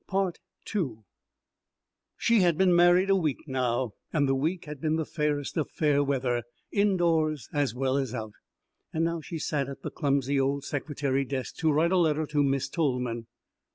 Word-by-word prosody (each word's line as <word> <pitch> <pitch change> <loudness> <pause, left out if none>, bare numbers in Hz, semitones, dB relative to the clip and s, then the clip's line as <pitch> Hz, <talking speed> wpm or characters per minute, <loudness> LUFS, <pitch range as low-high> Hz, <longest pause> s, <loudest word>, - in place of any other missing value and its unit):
She 230 -1 +3
had 170 -3 +3
been 185 -1 +4
married 175 +2 +5
a - - +6
week 155 -8 0
now, 125 -3 -1 0.2
and 145 -3 +2
the 135 - +2
week 160 +7 -1
had 150 -2 -8
been 155 -1 +1
the 160 -1 -1
fairest 150 -2 -2
of 155 - 0
fair 145 -2 +2
weather, 130 -3 0 0.3
indoors 170 - +2
as 145 -4 0
well 135 +1 +1
as 135 -4 -1
out. 110 -4 -5 0.6
Now 165 +1 0
she 165 - -6
sat 145 -3 -1
at 140 - -9
the - - -4
clumsy 140 -2 +1
old 140 +1 0
secretary 140 -2 -1
desk 135 -1 -4
to 160 -2 +2
write 160 +4 +2
a 190 - +3
letter 155 -3 +2
to 150 0 0
Miss 135 -1 +1
Tolman. 125 -7 -1
145 Hz, 165 wpm, -28 LUFS, 135-165 Hz, 0.6 s, a